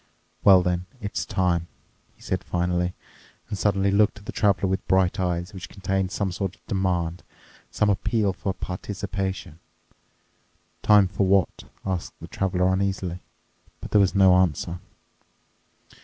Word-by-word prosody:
"Well 95 -2 +7
then, 90 0 -1
it's 100 -3 -4
time," 85 -2 0 0.5
he - - -20
said 95 0 -2
finally 90 0 -1 0.5
and 105 - -2
suddenly 100 0 +1
looked 105 +1 +3
at 100 - -14
the - - -5
Traveler 100 -2 +2
with 95 +1 -2
bright 95 -1 +2
eyes 90 +1 -1
which 90 -2 -8
contained 95 -1 -1
some 100 -3 -1
sort 95 +1 -3
of - - -35
demand, 90 -3 -1 0.5
some 105 - +1
appeal 100 0 +1
for 95 +1 -3
participation. 95 -3 -5 1.2
"Time 105 -2 +6
for 95 +1 0
what?" 95 -2 +2 0.2
asked 95 -3 -3
the - - -9
Traveler 95 -1 0
uneasily. 95 -2 -1 0.6
But - - -9
there 105 - +5
was 95 +1 +2
no 95 -2 +6
answer. 90 -1 0
95 Hz, 140 wpm, -25 LUFS, 90-100 Hz, 1.2 s, Well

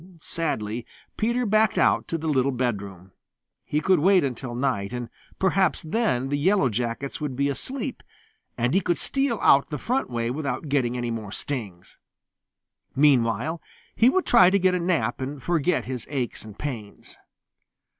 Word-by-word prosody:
Sadly 120 -9 -3 0.3
Peter 235 +3 0
backed 215 0 +3
out - - +3
to 165 - -2
the 160 - -7
little 140 -2 +2
bedroom. 100 -7 -3 0.5
He 150 - -1
would 185 -3 +5
wait 185 +2 +4
until 125 -2 -4
night, 120 -6 -1
and 120 -1 -4 0.3
perhaps 190 -1 +1
then 155 - 0
the 145 0 0
Yellow 185 -3 +3
Jackets 120 +5 -3
would 145 -4 -3
be 140 +2 +1
asleep, 255 - -4 0.6
and 120 +2 +1
he 190 - +3
could 175 -1 0
steal 270 -4 0
out 140 - +5
the 150 - -3
front 255 - -1
way 120 -1 -2
without 145 +2 -3
getting 125 -3 +1
any 120 -1 -2
more 110 -3 -5
stings. 100 -10 -6 1.0
Meanwhile 135 +2 +2 0.3
he 235 - +5
would 375 +6 +1
try 185 -7 +6
to 200 - +3
get 185 -1 +3
a 180 - +1
nap 165 -10 0
and 135 0 -5
forget 175 0 +1
his 125 -2 -5
aches 130 -5 -3
and 110 -2 -12
pains. 115 -8 -7
140 Hz, 165 wpm, -25 LUFS, 120-180 Hz, 1.0 s, try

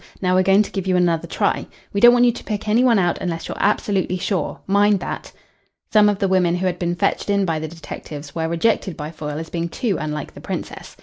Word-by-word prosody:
Now 180 -1 +1
we're 185 - +4
going 195 +2 +4
to - - -9
give 190 -1 -4
you 185 - +2
another 170 -2 +1
try. - - -1 0.3
We 200 - 0
don't 240 - +9
want 245 0 +4
you 240 - +5
to - - -9
pick 210 -1 -4
any 225 +4 +3
one 240 -3 +4
out 175 -3 +1
unless 165 -2 -4
you're - - -5
absolutely 195 -2 +1
sure. 180 -3 -2
Mind 200 +1 +3
that." - - -5 0.6
Some 210 -1 +6
of 205 - 0
the 195 - 0
women 180 -2 +2
who 180 +1 -2
had 180 -1 -1
been 175 -1 -1
fetched 175 - -1
in 200 -1 +2
by 165 -3 -1
the 160 - -4
detectives 150 -2 -9
were 160 -1 -2
rejected 180 +1 0
by 150 +1 -5
Foyle 150 -2 -5
as 160 0 -7
being 170 0 -2
too 210 - -1
unlike 150 0 -4
the - - -12
Princess. - - -6
185 Hz, 245 wpm, -21 LUFS, 165-205 Hz, 0.6 s, don't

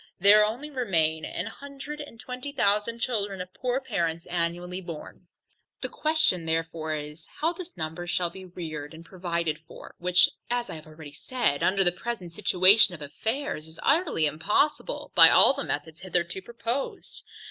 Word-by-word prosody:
There 205 +3 +7
only 245 +8 -3
remain 165 - 0
a - - -4
hundred 280 +1 -8
and 260 -6 -11
twenty 250 +4 -6
thousand 210 -1 +1
children 205 -6 -1
of 180 0 -7
poor 250 +1 -1
parents 170 -10 -2
annually 175 +1 -2
born. 170 -4 -9 0.5
The - - -1
question 310 - +2
therefore 160 -1 -2
is, 150 +2 -8
How 325 +3 +1
this 355 0 -10
number 160 +2 -4
shall 175 0 0
be 190 +2 -10
reared 160 -4 -7
and 165 +1 -12
provided 170 -4 -2
for? - - -12
which, 180 +1 +5 0.2
as 245 0 -1
I - - -5
have 155 -1 -10
already 155 -2 -11
said, 235 - -1
under 195 +1 +3
the 175 - +4
present 185 -2 -5
situation 185 +1 +5
of 155 - -13
affairs, 220 - -3
is 160 +1 -13
utterly 300 - +2
impossible 210 - 0
by - - +9
all - - +8
the 275 - -4
methods 155 +2 -4
hitherto 175 0 -2
proposed. 235 +5 -4
185 Hz, 165 wpm, -27 LUFS, 165-240 Hz, 0.5 s, by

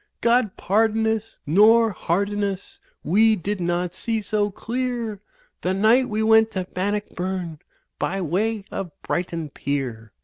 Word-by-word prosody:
God 235 -3 +2
pardon 220 +3 +2
us, 220 0 -2
nor 220 +7 +5
harden 200 +3 -1
us; 195 -1 -4 0.2
we 220 +6 +4
did 200 +1 -3
not 175 0 -1
see 225 +4 -1
so 210 0 0
clear 235 -1 -3 0.4
The 185 +1 0
night 230 +6 +4
we 215 0 0
went 220 0 +5
to 185 - -1
Bannockburn 185 -4 -3 0.4
by 195 - -1
way 195 +5 -1
of 195 -2 -4
Brighton 170 -4 -3
Pier. 125 -8 -4
205 Hz, 135 wpm, -23 LUFS, 180-220 Hz, 0.4 s, nor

